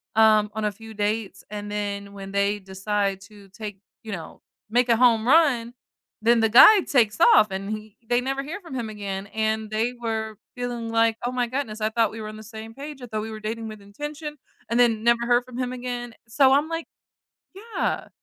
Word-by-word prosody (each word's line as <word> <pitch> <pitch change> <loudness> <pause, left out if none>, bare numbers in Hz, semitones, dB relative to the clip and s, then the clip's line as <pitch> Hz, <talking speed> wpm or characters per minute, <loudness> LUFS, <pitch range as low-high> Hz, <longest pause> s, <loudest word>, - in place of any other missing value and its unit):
um, 215 -1 +5
on 215 0 -2
a 210 - +1
few 225 +2 -12
dates 205 -1 -2
and 205 0 -6
then 200 -1 -3
when 195 -1 -8
they 200 +1 +1
decide 195 0 -2
to 205 0 -15
take, 205 -1 -8 0.2
you 220 - -7
know, 170 -5 -7 0.3
make 245 +2 +2
a 230 - +5
home 230 -2 +4
run, 260 -6 +4 0.5
then 235 +1 +4
the 225 - +3
guy 385 - +9
takes 225 -9 +2 0.2
off 215 - +6
and 195 +1 -4
he 215 -1 -6
they 240 0 +3
never 270 +2 -2
hear 325 +8 -6
from 335 -7 -9
him 235 -3 -3
again. 200 -2 -5
And 220 +1 -1
they 225 +3 0
were 220 -2 -3 0.2
feeling 245 -2 -4
like, 225 0 +3
oh 245 - 0
my 250 -1 0
goodness, 235 -4 -3
I 215 - +2
thought 225 -2 +2
we 225 - -8
were 215 - -6
on 215 - -8
the 215 - -10
same 220 +1 -9
page. 285 +1 -9
I - - -6
thought 215 -2 -3
we 220 +1 -6
were 215 - -7
dating 225 +1 -4
with 215 -1 -9
intention 295 +9 -7 0.3
and 230 - +1
then 230 -3 +4
never 235 0 +3
heard 245 0 +3
from 250 -1 -10
him 250 -1 -2
again. 245 -1 -5
So 265 +4 +4
I'm 290 +3 +3
like, 330 0 -3 0.7
yeah. 440 +4 -3
225 Hz, 215 wpm, -24 LUFS, 210-245 Hz, 0.7 s, guy